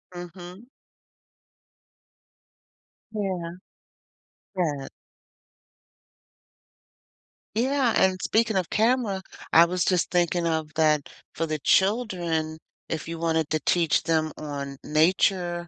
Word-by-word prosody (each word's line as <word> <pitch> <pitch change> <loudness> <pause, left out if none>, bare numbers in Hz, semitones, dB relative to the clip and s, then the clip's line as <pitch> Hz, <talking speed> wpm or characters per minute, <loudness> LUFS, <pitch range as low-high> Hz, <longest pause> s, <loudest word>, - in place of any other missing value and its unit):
Mhm. 180 +5 -10 2.5
Yeah. 185 -5 -3 1.1
That. 145 -6 -1 2.7
Yeah, 255 +1 +2
and 185 -1 +2
speaking 225 -1 +1
of 185 -3 0
camera, 220 -3 +1 0.3
I 165 +1 +8
was, 180 +1 -1
just, 180 -3 +1
thinking 175 -1 +1
of 160 -2 -1
that, 155 -2 +2 0.2
for 165 - -2
the 155 0 -2
children, 175 - +1 0.3
if 160 -1 -4
you 165 0 -5
wanted 160 -2 0
to 155 - 0
teach 170 -3 +2
them 160 -2 +1
on 140 -2 -6
nature 175 +2 +1
175 Hz, 95 wpm, -25 LUFS, 160-190 Hz, 2.7 s, I